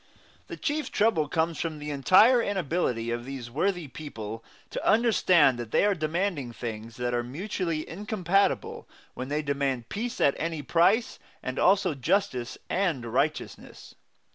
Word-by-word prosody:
The - - -7
chief 305 -1 -2
trouble 205 -9 +2
comes 160 +1 -1
from 160 -2 -3
the 150 0 -5
entire 200 - +5
inability 165 - -1
of 120 0 -3
these 130 -2 -7
worthy 175 +3 -1
people 115 -6 -7 0.3
to - - -4
understand 180 - +4
that 120 -2 -5
they - - +3
are 205 - +3
demanding 155 -5 -2
things 115 -1 -6
that 125 0 -2
are 120 - +1
mutually 165 - -3
incompatible 195 0 -1 0.2
when 130 - -5
they 150 +2 -1
demand 140 -4 -1
peace 240 +4 -4
at 140 - +4
any 165 -2 -3
price, 185 - +2 0.2
and 130 +1 -3
also 190 -3 +3
justice 130 - -1
and 175 -10 0
righteousness. - - -3
155 Hz, 145 wpm, -27 LUFS, 130-195 Hz, 0.3 s, entire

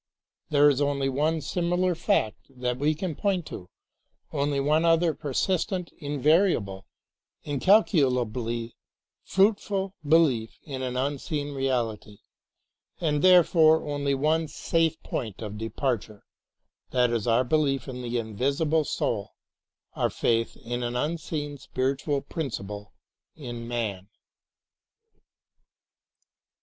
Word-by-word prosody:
There 145 -1 +5
is 145 -1 +3
only 140 -1 +1
one 155 +4 0
similar 175 +3 0
fact 170 - 0
that 125 -1 -3
we 150 +2 +2
can 175 +1 -3
point 185 +1 -1
to, 90 - -9 0.6
only 140 -1 0
one 150 +3 +2
other 165 0 +3
persistent, 180 - -1
invariable, 145 - +1 0.6
incalculably 125 - +2 0.5
fruitful 195 -1 +1
be 155 +2 +5
lief 125 -9 +1
in 135 -3 -6
an 125 -1 -3
unseen 145 +2 -2
reality, 120 -6 -2 0.8
and 150 -4 0
therefore 165 -4 +5
only 145 -1 0
one 155 +4 +1
safe 165 +1 0
point 110 -6 -4
of 105 0 -6
departure, 115 -2 -3 0.3
— - - -55
that 125 -1 +3
is 115 -1 -1
our 115 +2 +4
belief 140 0 +1
in 125 -1 -6
the 120 0 -2
invisible 140 +8 0
soul, 105 -7 -2 0.6
our - - 0
faith 115 0 0
in 120 +1 -4
an 120 0 -3
unseen 150 0 -3
spiritual 135 +3 -1
principle 105 - -5 0.4
in 120 -5 -7
man. 105 -5 -3
140 Hz, 115 wpm, -26 LUFS, 120-160 Hz, 0.8 s, There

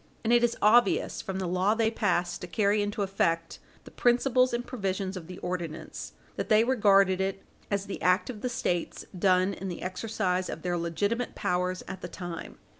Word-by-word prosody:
And 230 +1 +2
it 240 0 +5
is 235 0 +2
obvious 220 0 +4
from 190 -1 -4
the 190 - -2
law 185 +4 +2
they 225 -1 +2
passed 175 -5 0
to 180 - -5
carry 205 +3 +2
into 205 0 -1
effect 165 -4 -1 0.2
the - - -13
principles 255 +1 +3
and 240 +1 -2
provisions 195 -5 -3
of 170 -3 -7
the 180 0 -8
ordinance 175 -3 -5 0.2
that - - -3
they 215 0 +6
regarded 200 -6 +4
it 195 0 -2 0.3
as 200 -1 -1
the 200 - -6
act 180 +2 +3
of 235 -5 -7
the 250 - -1
States 175 -7 -2
done 185 +1 +3
in 195 - -6
the 175 - -6
exercise 185 -1 -1
of - - -6
their 175 -1 0
legitimate 200 +8 -1
powers 180 +1 -1
at 190 - -7
the - - -5
time. 175 -2 -7
195 Hz, 190 wpm, -28 LUFS, 180-220 Hz, 0.3 s, they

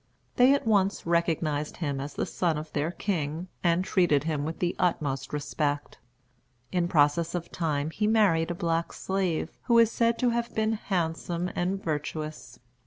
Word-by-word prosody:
They 250 +2 +6
at 280 - -3
once 200 -3 +2
recognized 165 -3 0
him 140 -5 -2
as 140 +1 -6
the - - -1
son 170 -4 0
of 155 +1 -7
their 150 +2 0
king, 170 -2 -3
and 175 +2 +2
treated 175 -9 +3
him 150 -2 -1
with 160 +1 -4
the 175 -1 -1
utmost 145 -6 0
respect. 145 -1 -2 0.7
In 175 -1 +1
process 165 +1 +2
of 175 -1 -4
time 155 -3 -1
he 210 +5 0
married 195 -7 +3
a 175 - -2
black 165 -1 -1
slave, 185 -4 -1
who 235 -2 +4
is 230 -1 +6
said 230 0 +2
to 245 -1 +2
have 235 0 -2
been 220 0 +1
handsome 175 -3 -2
and 190 +3 -1
virtuous. 155 0 -4
170 Hz, 170 wpm, -28 LUFS, 155-190 Hz, 0.7 s, They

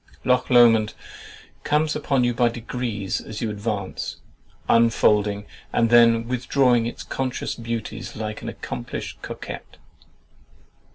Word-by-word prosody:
Loch 125 0 +2
Lomond 115 -3 +5 0.7
comes 150 +1 +1
upon 140 -4 +1
you 120 0 +2
by 120 0 +3
degrees 115 -4 -3
as 110 - -7
you 115 -3 -2
advance, 105 -2 -4 0.5
unfolding 105 -3 +3 0.3
and 115 0 +2
then 115 -1 +6
withdrawing 125 -1 +2
its 120 - -6
conscious 130 -1 -3
beauties 115 -1 -5
like 110 -1 -5
an - - -5
accomplished - - -6
coquet. - - -6
115 Hz, 115 wpm, -23 LUFS, 110-125 Hz, 0.7 s, then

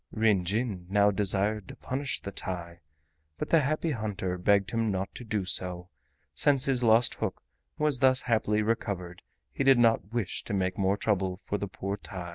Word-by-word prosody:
Ryn 105 -5 +2
Jin 100 -2 -2
now 100 +1 +4
desired 100 +1 0
to - - -9
punish 135 +1 -3
the 100 - -6
TAI, 85 -3 -5 0.6
but - - -5
the 165 - +6
Happy 155 +3 0
Hunter 105 -7 -3
begged 100 +1 +2
him 115 -1 0
not 95 -1 -2
to - - -9
do 105 -4 -2
so; 90 -1 -2 0.4
since 140 -3 +3
his 130 -3 +1
lost 115 +1 +5
hook - - -3 0.3
was 150 -4 +2
thus 130 0 +4
happily 110 -2 +1
recovered 95 -5 -3 0.3
he - - -1
did 135 -1 +6
not 115 -4 +3
wish 115 -6 -2
to 105 - -2
make 95 -1 0
more 100 +1 +1
trouble 95 -4 0
for 105 - -2
the 100 - -3
poor 100 +1 -4
TAI. 90 -3 -7
105 Hz, 185 wpm, -28 LUFS, 95-115 Hz, 0.6 s, the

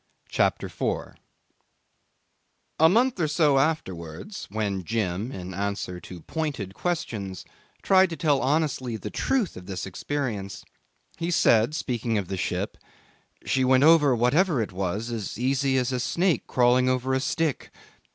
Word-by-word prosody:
CHAPTER - - +1
4 - - -3 1.6
A 160 +1 +7
month 235 +3 +2
or 160 - +2
so 150 -3 +3
afterwards, 95 - -3
when 100 -2 -2
Jim, 105 +2 -2
in 95 -5 -7
answer 100 -2 -3
to 90 0 -10
pointed 140 - -4
questions, 105 - -3 0.4
tried 190 -1 +5
to 165 - -4
tell 150 -5 +2
honestly 135 -5 0
the - - -7
truth 255 -8 0
of 90 0 -10
this 95 -3 -4
experience, 105 -1 -4 0.5
he 170 0 -2
said, 120 -5 +3
speaking 120 -6 -1
of 95 -4 -3
the 95 - -3
ship: - - -3 0.7
'She 130 - +1
went 130 +1 +4
over 150 -4 +6
whatever 140 +7 +2
it 110 - -2
was 100 +5 -3
as 110 -4 -4
easy 130 +2 +1
as 125 0 0
a 125 - -1
snake 170 +8 0
crawling 125 +1 +3
over 130 +1 0
a 130 - +2
stick. 155 +1 -1
125 Hz, 145 wpm, -26 LUFS, 100-155 Hz, 1.6 s, A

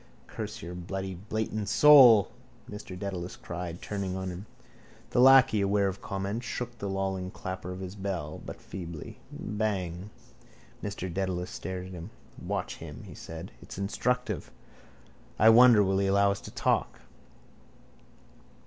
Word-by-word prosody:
—Curse - - -7
your 85 +2 -6
bloody 95 +2 -5
blatant 105 +2 -3
soul, 125 -5 +8 0.4
Mr 105 -3 -8
Dedalus 90 -2 -5
cried, 85 0 -6
turning 100 -3 -3
on 95 0 -3
him. 90 +4 -8 0.6
The - - +1
lacquey, 130 -5 +7
aware 100 0 +2
of 95 0 -4
comment, 100 +4 -3
shook 120 0 -4
the 100 - -3
lolling 95 -1 -2
clapper 95 -1 -6
of 90 +1 -7
his 95 0 -6
bell 95 -7 -4
but - - -8
feebly: 85 -4 -8
—Bang! 100 -3 -3 0.7
Mr 100 -3 -4
Dedalus 95 -1 -2
stared 95 -1 -5
at 95 - -9
him. 85 +2 -7 0.3
—Watch - - -3
him, - - -9
he - - -10
said. 80 +2 -8
It's - - -10
instructive. 125 +5 -1 0.9
I 110 - +7
wonder 115 -2 +8
will 95 0 +1
he 100 - +1
allow 100 +1 +4
us 100 - -4
to - - -10
talk. 65 -1 0
95 Hz, 145 wpm, -29 LUFS, 90-105 Hz, 0.9 s, soul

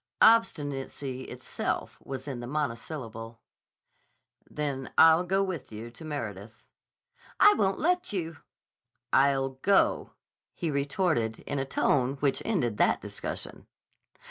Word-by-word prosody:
Obstinacy 145 - +2
itself - - -4
was 135 +1 -6
in 130 -4 -4
the 120 - -6
monosyllable. 115 -4 -4 1.1
"Then 140 -3 -3
I'll 160 +2 +7
go 190 +2 +1
with 175 -11 -5
you 110 +2 -8
to 120 - -12
Meredith." 115 -7 -6 0.8
"I 415 - +8
won't 195 - +1
let 355 0 +1
you." 165 -5 -3 0.8
"I'll 135 -1 +3
go," 200 -1 +2 0.4
he 165 -3 -2
retorted 140 - 0
in 140 - -3
a 135 - -1
tone 130 -1 +1
which 140 -1 0
ended 130 - 0
that - - +3
discussion. - - -6
140 Hz, 115 wpm, -28 LUFS, 125-165 Hz, 1.1 s, I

